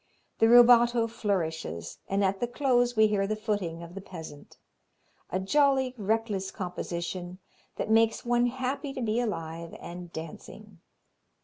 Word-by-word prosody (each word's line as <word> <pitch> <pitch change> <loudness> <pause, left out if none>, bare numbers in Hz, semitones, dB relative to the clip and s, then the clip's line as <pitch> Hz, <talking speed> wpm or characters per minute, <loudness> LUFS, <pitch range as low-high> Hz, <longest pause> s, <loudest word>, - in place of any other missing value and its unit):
The 225 - +5
rubato 240 -1 +7
flourishes, 165 - -3
and 195 +1 +1
at 190 0 0
the 240 - 0
close 245 -1 +1
we 220 0 +6
hear 205 -2 +1
the 215 - -1
footing 205 -6 -3
of 170 +1 -10
the 195 - -7
peasant. 160 -6 -11 0.7
A 185 - -1
jolly, 265 +4 +2
reckless 215 -3 -1
composition 180 0 -5 0.4
that - - -3
makes 225 +1 +3
one 240 0 +3
happy 265 +3 -3
to 260 - -5
be 220 +1 0
alive 165 -7 -4
and 175 0 -9
dancing. 175 +5 -10
210 Hz, 140 wpm, -28 LUFS, 180-240 Hz, 0.7 s, rubato